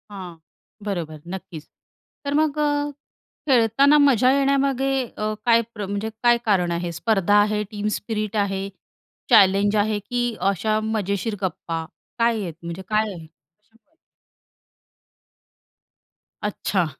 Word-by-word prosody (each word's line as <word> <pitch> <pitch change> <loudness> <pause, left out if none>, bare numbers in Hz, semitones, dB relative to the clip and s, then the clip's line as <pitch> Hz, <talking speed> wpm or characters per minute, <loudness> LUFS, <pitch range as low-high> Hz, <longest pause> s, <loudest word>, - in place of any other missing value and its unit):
हां. 185 -4 -9 0.5
बरोबर, 165 -7 -4
नक्कीच. 175 -4 -8 0.6
तर 280 - -1
मग 305 0 +1
अ, 290 -1 +1 0.6
खेळताना 265 +3 +5
मजा 260 -4 +5
येण्यामागे 275 -1 +2 0.3
अ, 215 0 -1
काय 230 -1 +5
प्र 210 -2 -5
म्हणजे 205 +3 -3
काय 240 0 +5
कारण 185 -5 +2
आहे 170 0 -2
स्पर्धा 195 +3 +1
आहे, 210 0 0
टीम 210 0 -3
स्पिरिट 215 0 -4
आहे, 195 -1 -1 0.6
चॅलेंज 205 -2 +5
आहे, 210 0 +1
की 240 +3 -2 0.2
अशा 215 +3 0
मजेशीर 215 0 -2
गप्पा 165 -3 -3 0.3
काय 230 -1 +2
आहेत, 175 -4 -5
म्हणजे 170 +2 -6
काय 215 0 +1
आहे? 165 -3 -10
कशामुळे? 210 - -36 2.5
अच्छा. 200 -3 0
210 Hz, 120 wpm, -23 LUFS, 190-235 Hz, 2.5 s, खेळताना